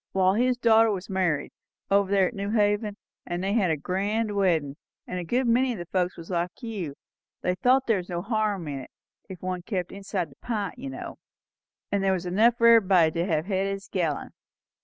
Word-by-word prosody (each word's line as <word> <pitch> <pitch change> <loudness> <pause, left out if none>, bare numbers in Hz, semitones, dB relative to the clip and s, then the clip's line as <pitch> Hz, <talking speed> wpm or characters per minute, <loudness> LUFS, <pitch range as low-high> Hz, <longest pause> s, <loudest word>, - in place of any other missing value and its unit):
Wall, 190 0 +3
his 245 +3 +2
daughter 225 -2 +5
was 195 -1 -3
married, 180 -6 0 0.4
over 200 -1 +3
here 195 -2 +4
at 245 - -2
New 200 -1 -4
Haven; 210 -1 +1 0.3
and 175 +1 -4
they 195 +1 0
had 205 -6 +2
a 160 - +1
grand 205 +6 -1
weddin', 165 -8 +1 0.3
and 180 - -4
a - - -4
good 245 +9 0
many 245 +1 +2
o' - - -8
the 175 - -6
folks 180 0 -1
was 170 +2 -9
like 175 +5 -2
you, 195 -11 -4 0.5
they 180 - +1
thought 255 +8 +3
there 225 -3 +2
was 180 -1 -6
no 175 -1 -3
harm 210 -5 -1
in 140 -2 -4
it, 130 - -10 0.4
if 185 -2 -9
one 185 -1 -2
kept 180 -2 -3
inside 195 -5 -4
the 135 - -19
pint, 220 0 -4
you 270 +2 -5
know; - - -8 0.7
and 200 -1 +1
there 190 -1 +3
was 185 -1 -3
enough 220 +7 +3
for 235 - +2
everybody 195 -8 +6
to 170 +3 -1
hev 160 -3 0
had 195 -1 0
his 195 0 -4
gallon. 165 -7 -2
195 Hz, 215 wpm, -26 LUFS, 180-215 Hz, 0.7 s, everybody